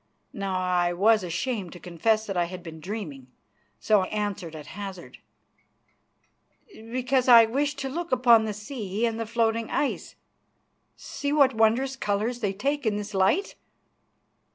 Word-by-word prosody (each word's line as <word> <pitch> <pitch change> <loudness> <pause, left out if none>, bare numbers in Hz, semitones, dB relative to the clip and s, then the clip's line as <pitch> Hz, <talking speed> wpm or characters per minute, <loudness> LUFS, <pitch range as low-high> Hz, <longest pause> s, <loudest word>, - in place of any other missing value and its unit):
Now 195 -2 -2
I 180 -1 +1
was 210 +3 +3
ashamed 185 +2 -3
to 175 - -11
confess 215 +6 0
that 195 - -4
I 175 -1 +2
had 180 +1 -8
been 160 -2 -9
dreaming, 155 - -6 0.5
so 205 - +3
I 185 - -2
answered 205 -6 -4
at 150 -2 -9
hazard: 195 -3 -8 1.5
"Because 255 +2 -1
I 235 -2 +9
wished 285 +5 -1
to 270 - -2
look 335 +6 -5
upon 240 -3 +5
the 215 - -2
sea 215 -1 -3
and 230 -1 -2
the 225 - -3
floating 230 0 0
ice. 290 - -2 0.8
See 285 0 -5
what 280 -3 +4
wondrous 230 +4 +2
colours 220 +1 -1
they 205 -5 -1
take 275 +6 -2
in 210 - +1
this 210 0 -6
light!" 195 - +2
220 Hz, 155 wpm, -26 LUFS, 190-245 Hz, 1.5 s, I